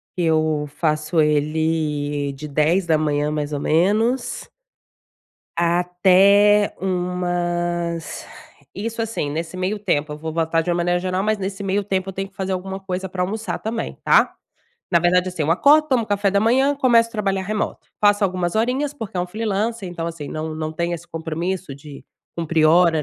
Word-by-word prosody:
que 180 - -2
eu 155 -2 +1
faço 155 +1 0
ele 150 -1 0
de 150 +3 -8
10h 160 +6 +2
da 160 -2 +3
manhã 150 -1 0
mais 150 -1 -3
ou 145 - -1
menos 215 - +1 1.1
Até 185 +4 +4
umas 175 -2 -2 0.5
isso 225 +3 -3
assim, 220 -10 -3
nesse 165 +3 -4
meio 185 +3 -2
tempo, 150 -7 -1
eu - - -8
vou 160 +1 -5
botar 165 0 +1
de 175 - -2
uma 170 - +1
maneira 175 +1 +1
geral, 185 +1 -1
mas 215 +1 +1
nesse 195 0 -5
meio 195 +1 0
tempo, 190 -1 -1
eu - - -4
tenho 195 +1 -4
que - - -36
fazer 190 0 -3
alguma 190 +1 -4
coisa 190 0 -4
pra 185 0 -6
almoçar 210 0 -3
também, 225 +1 -4
tá. - - +4 0.6
Na 170 - +5
verdade, 180 +2 +2
assim, 180 -4 -3
eu 155 - 0
acordo, 295 - +5
tomo 240 -5 +1
café 205 -1 +1
da 200 +1 +2
manhã, 265 +6 +3
começo 235 -4 +4
a - - -23
trabalhar 195 -3 -1
remoto. 210 +2 -3
Faço 205 0 +4
algumas 180 -1 -1
horinhas 265 +6 0
porque 220 -8 -7
é - - +1
um 180 - -2
freelancer, 215 +1 -2
então 170 -1 -5
assim, 165 -3 -6
não 155 0 -4
não 155 0 -4
tem 170 +2 -2
esse 170 +1 -9
compromisso 165 0 -4
de 140 0 -12 0.3
cumprir 165 -1 +1
hora 165 -1 +4
180 Hz, 180 wpm, -21 LUFS, 160-200 Hz, 1.1 s, Na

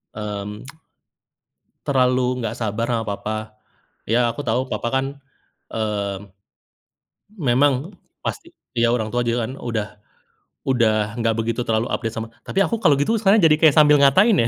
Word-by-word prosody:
Mmm. 105 0 -5 1.2
Terlalu 125 -2 +2
nggak 115 -2 -3
sabar 115 0 -2
ama 115 - -1
papa, 110 +1 -5 0.5
iya, 120 +1 +2
aku 115 - -10
tahu, 115 +3 +2
papa - - -2
kan, 135 0 +1 0.7
mmm, 100 -3 -3 1.1
memang 140 +4 +1 0.3
pasti 340 -5 -4 0.3
iya, 115 0 +3
orang 110 -3 -1
tua 120 - +2
juga 115 -1 0
kan 125 - -7
udah 110 -3 -2 0.8
udah 120 -4 +3 0.3
nggak 115 -1 +1
begitu 115 +2 -1
terlalu 110 +1 +1
update 115 -2 -2
sama 115 0 -4 0.2
tapi 195 - -1
aku 230 - -1
kalau 145 - +5
gitu, 220 +11 +1
sekarang 205 +1 +4
jadi 155 -2 +6
kayak 155 -3 +5
sambil 150 -1 +7
ngatain 190 +11 +5
ya. - - +1
120 Hz, 150 wpm, -21 LUFS, 110-140 Hz, 1.2 s, sambil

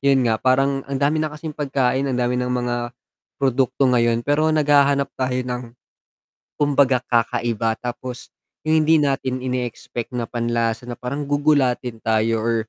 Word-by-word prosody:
'yun 135 -2 +3
nga, 110 -2 +1
parang 135 +1 +2
ang 140 - -2
dami 145 +3 +1
na 155 - 0
kasing 150 +1 -7
pagkain, 135 -2 0
ang 130 - -1
dami 125 0 0
nang 125 - -2
mga 120 -1 -1 0.5
produkto 135 0 +1
ngayon, 120 -2 +2
pero 150 +2 +2
naghahanap 145 -2 +3
tayo 130 -1 -2
ng, 125 0 -3 0.9
kumbaga, 140 -3 +2
kakaiba. 115 -2 0
Tapos 125 +1 -6 0.3
'yung 155 0 +2
hindi 160 - +6
natin 135 -4 0
ine-expect 125 -1 -4
na 120 - -1
panlasa 115 0 -2
na 120 - -5
parang 140 +4 -5
gugulatin 140 -5 +1
tayo 110 0 +1
or 115 +1 0
130 Hz, 150 wpm, -21 LUFS, 120-140 Hz, 0.9 s, hindi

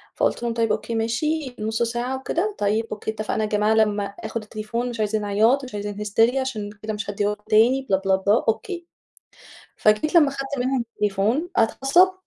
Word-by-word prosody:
فقُلت - - 0
لهم 235 -1 -1
طيب 230 -2 +1
أوكي 220 +2 -2
ماشي 255 +4 -1
نُص 220 +2 -2
ساعة 240 +3 -2
وكده 345 +10 -2
طيب 210 +2 +1
أوكي 215 +1 -3
اتفقنا 215 0 -2
يا 210 - -1
جماعة 210 +1 +2
لمّا 210 -2 +2
آخُد 220 +2 -6
التليفون 215 +3 -4
مش 235 -2 -7
عايزين 215 0 0
عياط 220 +7 +3
مش 255 - -9
عايزين 205 0 -4
hysteria 225 +4 +3
عشان 240 -6 -2
كده 215 0 -3
مش 205 -1 -5
هادّيه 205 0 0
لكم 210 - -8
تاني 245 +5 +4
بلا، 190 - +4
بلا، 190 0 +4
بلا 200 +4 +2
أوكي 345 - -2 0.9
فجيت 215 +10 +2
لمّا 300 -5 +6
خدت 275 0 -5
منهم 250 -1 0
التليفون 210 - 0
اتعصبوا 315 +11 +4
225 Hz, 185 wpm, -23 LUFS, 210-260 Hz, 0.9 s, لمّا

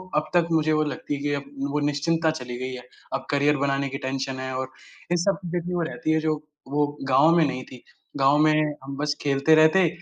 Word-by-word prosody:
अब 155 0 0
तक 175 -1 +3
मुझे 155 -1 +2
वो 155 0 +3
लगती 145 0 -4
है 140 - -7 0.2
कि 140 0 -15 0.2
वो 150 - 0
निश्चिंतता 160 +3 +1
चली 125 -5 -6
गई 130 0 -4
है, 125 -1 -8 0.3
अब 135 - -3
करियर 145 +1 +3
बनाने 140 0 0
की 135 - -4
टेंशन 135 0 -3
है 130 0 -4
और 130 0 -4 0.4
इन 175 - +3
सब 195 +3 +1
चीज़ें 175 +1 -2
की 180 - -3
वो 175 - 0
रहती 160 -1 -2
है, 160 - +3
जो 155 0 0 0.3
वो 145 +2 +1 0.2
गाँव 160 +6 +5
में 165 -2 +5
नहीं 130 -2 -3
थी। 125 - -12 0.3
गाँव 135 +1 +4
में 155 0 +3
हम 135 0 -6
बस 145 0 -1
खेलते 140 +2 +3
रहते, 160 +4 +5
145 Hz, 230 wpm, -24 LUFS, 135-160 Hz, 0.4 s, गाँव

